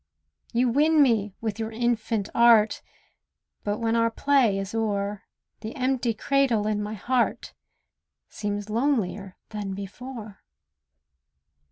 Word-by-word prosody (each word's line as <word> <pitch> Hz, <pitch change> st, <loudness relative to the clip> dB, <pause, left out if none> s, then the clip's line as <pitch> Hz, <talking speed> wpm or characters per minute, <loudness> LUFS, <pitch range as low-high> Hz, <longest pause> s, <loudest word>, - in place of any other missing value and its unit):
You 245 Hz, +2 st, +2 dB
win 300 Hz, +4 st, +4 dB
me 210 Hz, -6 st, +1 dB
with 220 Hz, -1 st, -3 dB
your 220 Hz, 0 st, -3 dB
infant 225 Hz, -2 st, -1 dB
art; 230 Hz, -2 st, +5 dB, 0.8 s
But 205 Hz, 0 st, -1 dB
when 225 Hz, 0 st, 0 dB
our 230 Hz, 0 st, +3 dB
play 245 Hz, -4 st, +2 dB
is 195 Hz, +1 st, -4 dB
o'er, 205 Hz, -2 st, -1 dB, 0.4 s
The 220 Hz, +4 st, -7 dB
empty 255 Hz, -3 st, 0 dB
cradle 260 Hz, -4 st, +1 dB
in 210 Hz, -1 st, 0 dB
my 210 Hz, +1 st, -4 dB
heart 240 Hz, +4 st, -1 dB, 0.7 s
Seems 205 Hz, -1 st, -4 dB
lonelier 215 Hz, -5 st, -1 dB
than 205 Hz, -3 st, -4 dB
before. 215 Hz, +2 st, -8 dB
225 Hz, 120 wpm, -26 LUFS, 205-245 Hz, 0.8 s, art